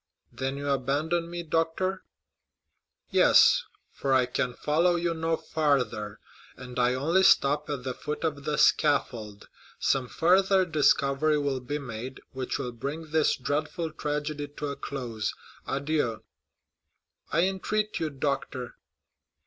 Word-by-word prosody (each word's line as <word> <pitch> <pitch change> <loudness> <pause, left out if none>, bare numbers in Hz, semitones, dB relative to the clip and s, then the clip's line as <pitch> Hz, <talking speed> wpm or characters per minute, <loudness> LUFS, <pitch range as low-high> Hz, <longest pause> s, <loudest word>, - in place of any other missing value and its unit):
"Then 135 +1 -3
you 140 0 -4
abandon 150 +5 0
me, 175 0 -5
doctor?" 165 +4 -1 1.1
"Yes, - - +6 0.3
for 135 -1 0
I 130 -1 +4
can 125 0 -2
follow 170 +4 +2
you 170 0 0
no 165 0 -1
farther, 125 -9 -1 0.4
and 125 -1 -7
I 125 +1 +3
only 165 +8 +2
stop 150 -4 +4
at 140 -4 -3
the 130 0 -3
foot 150 +5 -5
of 145 -3 -2
the 150 0 -1
scaffold. 115 -8 +1 0.3
Some 130 -2 +1
further 185 - +3
discovery 150 -2 +2
will 140 -2 -1
be 130 +4 -4
made, 125 -1 -7
which 130 -1 -3
will 125 - -4
bring 145 +7 -6
this 155 -1 +3
dreadful 150 +4 -2
tragedy 150 -1 -3
to 145 0 -5
a 140 - -4
close. 120 -8 -4 0.3
Adieu." 140 -5 -1 1.1
"I 165 +4 +3
entreat 210 +3 -1
you, 160 - -1
doctor!" 135 -3 -3
145 Hz, 135 wpm, -27 LUFS, 130-160 Hz, 1.1 s, Yes